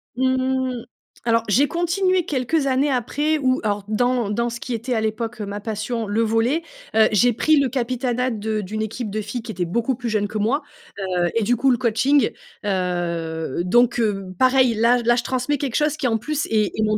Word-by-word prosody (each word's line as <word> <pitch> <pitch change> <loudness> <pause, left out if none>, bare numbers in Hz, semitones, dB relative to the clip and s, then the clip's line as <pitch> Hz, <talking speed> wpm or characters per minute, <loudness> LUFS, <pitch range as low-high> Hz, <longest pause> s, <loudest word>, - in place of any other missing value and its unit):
Mmh. 260 -1 0 0.4
Alors 230 -1 +2
j'ai 270 +8 +4
continué 355 +2 +1
quelques 275 +2 0
années 270 +2 +2
après, 290 +5 0
ou 255 -1 +2
alors 205 -1 -1
dans 245 0 +1
dans 235 +3 0
ce 235 0 -6
qui 250 - -5
était 235 +3 -2
à 225 - +1
l'époque, 220 +1 -3
heu, - - -3
ma 200 +1 -5
passion, 220 +2 -3
le 210 +3 0
volley. 225 +8 +1 0.3
Heu 220 -1 +6
j'ai 240 +4 +4
pris 310 +7 +3
le 275 - +2
capitanat 250 0 -1
de 215 -1 -2
d'une 215 +3 -4
équipe 220 +1 -4
de 215 +2 -3
filles 215 +4 -5
qui 225 0 -7
étaient 180 -3 -2
beaucoup 235 +8 -1
plus 245 -1 -4
jeunes 210 -2 0
que 215 - -5
moi. 230 +8 +1 0.5
Heu 180 -2 +1
et 230 - +2
du 245 +4 +2
coup 265 +3 +3
le 245 - +2
coaching. 250 +4 +2 0.4
Heu, 170 -5 -2
donc, 240 +6 +3
heu, 205 -4 0
pareil 255 -1 +4
là 230 +3 +4
j - - -5
là 240 +1 +4
je 245 - -1
transmets 255 +4 -1
quelque 270 -4 -3
chose 300 0 +2
qui 270 - 0
en 225 -2 +1
plus 300 +7 -2
est 215 -2 0
est 220 - +1
mon 215 0 +2
235 Hz, 215 wpm, -22 LUFS, 215-260 Hz, 0.5 s, Heu